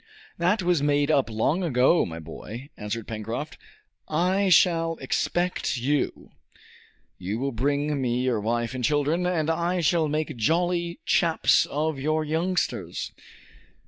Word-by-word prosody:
"That 185 +4 +2
was 175 -4 +2
made 145 +1 +2
up 140 -5 +2
long 115 - 0
ago, 150 0 +3
my 80 -1 -7
boy," 115 - -9
answered 105 +1 -5
Pencroft. 115 +8 -5 0.5
"I 185 +5 +1
shall 165 -2 +4
expect 175 -6 -1
you. 140 +4 -1 0.9
You 95 +4 -3
will 135 +3 -2
bring 140 +4 0
me 125 0 0
your 125 -4 +1
wife 120 +2 -1
and 130 -1 -4
children, 150 +5 +1
and 165 -4 0
I 170 +2 0
shall 160 0 +2
make 150 -1 -2
jolly 170 +7 0
chaps 165 -2 +3
of 155 0 -2
your 155 +3 0
youngsters!" 170 +4 -2
150 Hz, 135 wpm, -25 LUFS, 125-170 Hz, 0.9 s, shall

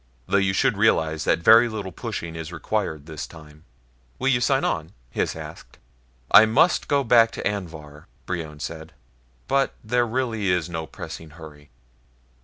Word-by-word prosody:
Though 100 - +1
you 95 -1 +1
should 115 0 +1
realize 80 -8 +2
that 85 - +1
very 115 +4 +7
little 105 -4 -5
pushing 85 0 -6
is 80 0 -6
required 80 -3 -3
this 80 -2 -7
time." 75 -1 -15 0.5
"Will 135 - 0
you 120 -2 +2
sign 135 +2 +2
on?" 80 -4 -2 0.2
Hys - - -1
asked. - - -10 0.5
"I 110 - +9
must 115 +11 +3
go 140 -1 +2
back 115 -2 +5
to - - -2
Anvhar," 80 -7 -7 0.2
Brion 80 -4 -5
said, 80 +2 -7 0.5
"but 135 0 +1
there 120 +2 +1
really 115 -4 -1
is 90 -3 +1
no 80 -1 -4
pressing 80 +3 -9
hurry." 75 -2 -13
90 Hz, 160 wpm, -24 LUFS, 80-115 Hz, 0.5 s, I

